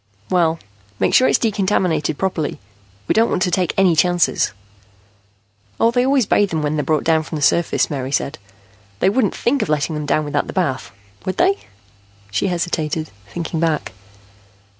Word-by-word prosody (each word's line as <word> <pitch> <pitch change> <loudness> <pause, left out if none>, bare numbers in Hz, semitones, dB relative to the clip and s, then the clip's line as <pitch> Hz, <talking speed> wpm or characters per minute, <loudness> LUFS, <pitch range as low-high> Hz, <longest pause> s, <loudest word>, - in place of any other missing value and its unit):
"Well, 165 -3 +2 0.4
make - - +1
sure 255 - +6
it's - - +4
decontaminated 185 -8 0
properly. 180 -6 -2 0.5
We - - +2
don't 225 +1 +3
want 185 - 0
to 180 - 0
take 180 -2 +1
any 190 -3 +4
chances." 175 +1 +2 1.3
"Oh, 230 - +4
they 245 +1 +2
always 265 -2 +3
bathe 205 +1 +2
them 160 -3 -2
when 150 +1 0
they're 150 - 0
brought 155 0 0
down 160 -1 +3
from 160 - -7
the 150 - -4
surface," 170 +3 +2
Mary 135 -3 -4
said. 140 - -1 0.6
"They 190 - +3
wouldn't 215 -2 +1
think 270 +3 0
of - - -2
letting 150 +1 0
them 150 -1 -4
down 155 +1 +1
without 145 0 -1
the - - -6
bath. 155 -9 -1 0.4
Would 185 - -3
they?" 380 +3 +3 0.8
She 105 - 0
hesitated, 165 -3 -2 0.2
thinking 165 - -4
back. 160 -2 0
170 Hz, 175 wpm, -19 LUFS, 155-195 Hz, 1.3 s, sure